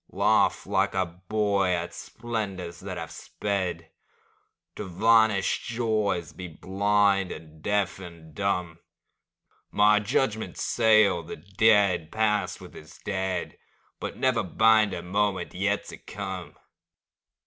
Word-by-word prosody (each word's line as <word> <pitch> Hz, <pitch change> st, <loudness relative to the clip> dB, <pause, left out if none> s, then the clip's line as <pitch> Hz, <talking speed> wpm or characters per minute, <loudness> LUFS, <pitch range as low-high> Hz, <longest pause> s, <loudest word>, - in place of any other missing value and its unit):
Laugh -, -, +2 dB
like -, -, 0 dB
a 95 Hz, -1 st, +2 dB
boy 100 Hz, +2 st, -1 dB
at 85 Hz, -1 st, -1 dB
splendors 100 Hz, -7 st, -5 dB
that 95 Hz, -1 st, -6 dB
have 80 Hz, -1 st, -6 dB
sped, 95 Hz, -5 st, -4 dB, 0.8 s
To -, -, -5 dB
vanished 105 Hz, +1 st, +3 dB
joys 110 Hz, -7 st, -1 dB
be 90 Hz, -, -7 dB
blind 100 Hz, +2 st, +1 dB
and 80 Hz, -1 st, -11 dB
deaf 100 Hz, 0 st, 0 dB
and 85 Hz, -4 st, -12 dB
dumb; 90 Hz, -2 st, -2 dB, 0.9 s
My 105 Hz, 0 st, +4 dB
judgments 110 Hz, +1 st, -1 dB
seal 110 Hz, -6 st, +4 dB
the -, -, -8 dB
dead 95 Hz, -1 st, +2 dB
past 105 Hz, -2 st, 0 dB
with -, -, -13 dB
its 75 Hz, -, -13 dB
dead, 95 Hz, -2 st, -3 dB, 0.4 s
But -, -, -5 dB
never 130 Hz, -3 st, +2 dB
bind 110 Hz, +2 st, +4 dB
a 85 Hz, -, -6 dB
moment 95 Hz, 0 st, -1 dB
yet 100 Hz, +2 st, -1 dB
to -, -, -9 dB
come. -, -, -7 dB
100 Hz, 120 wpm, -26 LUFS, 90-105 Hz, 0.9 s, My